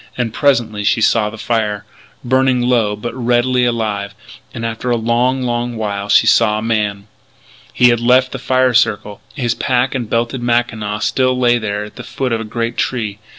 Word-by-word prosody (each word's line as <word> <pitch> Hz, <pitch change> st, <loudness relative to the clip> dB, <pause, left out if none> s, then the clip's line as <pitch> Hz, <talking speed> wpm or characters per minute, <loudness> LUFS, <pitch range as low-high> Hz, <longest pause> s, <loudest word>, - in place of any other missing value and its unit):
And 120 Hz, -3 st, -2 dB
presently 115 Hz, -7 st, +1 dB
she 110 Hz, -, +2 dB
saw 110 Hz, -1 st, +2 dB
the 110 Hz, -, -10 dB
fire, 105 Hz, -3 st, -2 dB, 0.4 s
burning 130 Hz, 0 st, +2 dB
low, 120 Hz, -4 st, +1 dB
but 115 Hz, +3 st, -6 dB
redly 125 Hz, 0 st, +1 dB
alive. 105 Hz, -4 st, -2 dB, 0.4 s
And, 115 Hz, -, -5 dB
after 115 Hz, +2 st, -4 dB
a 120 Hz, -, +2 dB
long, 120 Hz, +3 st, 0 dB
long 120 Hz, 0 st, -2 dB
while, 100 Hz, -2 st, -4 dB
she -, -, +5 dB
saw 105 Hz, +1 st, +3 dB
a -, -, -3 dB
man. 105 Hz, -3 st, -1 dB, 0.7 s
He 125 Hz, -, +4 dB
had 120 Hz, -1 st, +2 dB
left 125 Hz, +2 st, +3 dB
the -, -, -5 dB
fire 130 Hz, -1 st, +1 dB
circle. 110 Hz, -3 st, 0 dB
His 120 Hz, -5 st, -1 dB
pack 130 Hz, 0 st, 0 dB
and 120 Hz, -5 st, -4 dB
belted 120 Hz, +2 st, -1 dB
mackinaw 115 Hz, -3 st, -1 dB
still 130 Hz, -1 st, +1 dB
lay 120 Hz, -1 st, +3 dB
there 105 Hz, -2 st, -3 dB
at 105 Hz, -, -12 dB
the -, -, -7 dB
foot 130 Hz, -2 st, -3 dB
of 115 Hz, -1 st, -1 dB
a -, -, -6 dB
great 115 Hz, +2 st, -3 dB
tree. 110 Hz, -5 st, -2 dB
120 Hz, 190 wpm, -16 LUFS, 110-125 Hz, 0.7 s, she